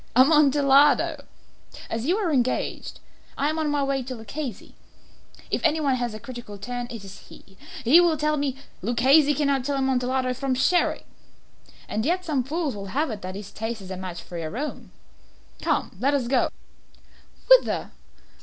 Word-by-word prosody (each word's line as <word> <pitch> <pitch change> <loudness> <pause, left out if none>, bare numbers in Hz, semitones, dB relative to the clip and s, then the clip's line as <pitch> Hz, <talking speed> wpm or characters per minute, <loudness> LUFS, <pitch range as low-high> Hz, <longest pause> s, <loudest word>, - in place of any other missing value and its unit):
"Amontillado!" 285 +1 +4 0.6
"As 225 +3 -3
you 360 +4 +2
are 365 -8 0
engaged, 255 -2 -1 0.4
I 290 +2 +1
am 315 - -3
on 310 -1 0
my 290 -1 +1
way 275 -1 0
to 255 0 -6
Luchesi. 230 +1 -7 0.8
If - - 0
any 320 -1 +3
one 280 -3 +1
has 245 -3 -2
a - - -7
critical 240 -3 -9
turn, 245 +4 -5
it 230 -4 -8
is 195 0 -12
he. 190 - -16 0.3
He 290 +9 +7
will 335 -3 +2
tell 300 0 +1
me 280 -3 -1
" - - -32
"Luchesi 275 +6 +4
cannot 280 -2 +1
tell 280 +1 -1
Amontillado 260 -1 0
from 260 +1 -2
Sherry." 345 +7 +2 0.8
"And 215 - -2
yet 360 +6 0
some 285 -6 0
fools 300 0 -2
will 200 -1 -7
have 280 +7 -1
it 210 -2 -6
that 185 +1 -6
his 200 0 -8
taste 225 +1 -4
is 190 -1 -10
a - - -3
match 180 -2 -7
for 170 0 -7
your 160 +6 -5
own." 295 +3 -5 0.7
"Come, - - -1
let 275 +5 +2
us 255 -4 -1
go." 255 0 +2 1.0
"Whither?" - - +5
265 Hz, 175 wpm, -25 LUFS, 230-295 Hz, 1.0 s, He